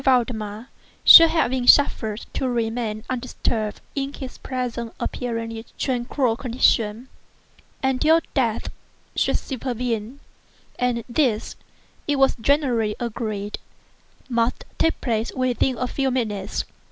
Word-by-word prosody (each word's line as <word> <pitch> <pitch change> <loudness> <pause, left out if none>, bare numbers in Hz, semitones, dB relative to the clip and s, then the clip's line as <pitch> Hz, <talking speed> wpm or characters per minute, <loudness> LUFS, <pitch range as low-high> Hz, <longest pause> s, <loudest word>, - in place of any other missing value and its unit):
Valdemar 235 -3 0 0.3
should 330 -1 +11 0.2
be 255 -2 -1
suffered 220 -7 +4
to 260 - -1
remain 225 -2 -2
undisturbed 235 -4 -3
in 275 -1 -2
his 260 -2 -8
present 245 -3 -4
apparently 230 -2 -4
tranquil 250 -1 0
condition, 230 -2 +1 0.8
until 285 +5 +4
death 235 -5 0 0.4
should - - +2
supervene—and 245 -1 -4
this, 235 -4 0 0.5
it 290 - +2
was 270 -1 +3
generally 240 -6 +2
agreed, 215 -3 -4 0.7
must 235 -2 0
now - - -31
take 325 - +2
place 225 -2 -1
within 255 0 0
a 250 - -1
few 270 +1 -1
minutes. 215 -6 -2
245 Hz, 105 wpm, -23 LUFS, 225-260 Hz, 0.8 s, should